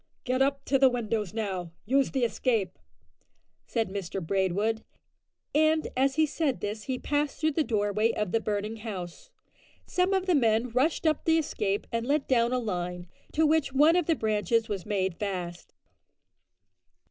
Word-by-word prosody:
"Get 255 +1 0
up 275 0 +1
to 270 - +2
the 265 -1 +7
windows 220 -5 -2
now; 190 -6 -3
use 270 +4 +2
the 265 -3 -1
escape," 220 -3 0 0.9
said 225 -2 0
Mr 195 -1 -4
Braidwood; 195 +5 0 0.7
and 310 +1 +3
as 265 +1 +2
he 315 0 +4
said 295 -3 -1
this 210 +1 -4
he 260 -1 -2
passed 290 +2 -1
through 315 0 +2
the 310 +2 +1
doorway 215 -2 +1
of 210 -4 -2
the 225 - +2
burning 210 +1 -3
house. 190 -6 -7 0.6
Some 365 +1 +1
of 380 -1 0
the 365 - +2
men 230 -3 +2
rushed 275 +8 +1
up 310 -2 +2
the 325 0 +4
escape 210 -10 -1
and 230 +1 -2
let 285 0 +1
down 235 -2 +3
a 255 - +1
line, 180 -6 -3 0.2
to 320 +1 +3
which 310 -3 +2
one 300 +5 +5
of 355 -3 +1
the 330 - +3
branches 220 - +1
was 200 -3 -4
made 190 -4 -1
fast. 180 -4 -4
230 Hz, 170 wpm, -28 LUFS, 205-280 Hz, 0.9 s, the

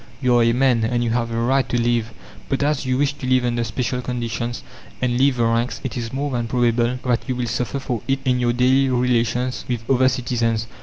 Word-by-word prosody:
You 125 -2 +3
are - - +4
a 115 - +4
man, 125 -2 +2
and 120 +1 0
you 115 - 0
have 115 0 0
the 115 - -3
right 125 +2 +1
to 120 - 0
live. 120 -1 0 0.4
But 135 0 0
as 145 -2 0
you 130 0 +1
wish 145 +1 +1
to 145 -3 -7
live 130 -1 +3
under 120 -1 0
special 125 +2 -2
conditions, 120 -1 -4 0.4
and 125 -1 0
leave 130 +1 +3
the 120 - +2
ranks, 115 +2 0
it 130 - -4
is 115 -2 -4
more 140 +2 -2
than 120 -2 -2
probable 120 0 +1
that 120 -2 +1
you 130 - 0
will 125 -1 -2
suffer 120 +3 -2
for 125 -5 -3
it 135 0 +2
in 125 -1 +2
your 120 -1 +2
daily 130 +2 +3
relations 125 0 0
with 115 -2 -3
other 130 -1 +4
citizens. 115 -3 -1
125 Hz, 235 wpm, -21 LUFS, 115-130 Hz, 0.4 s, are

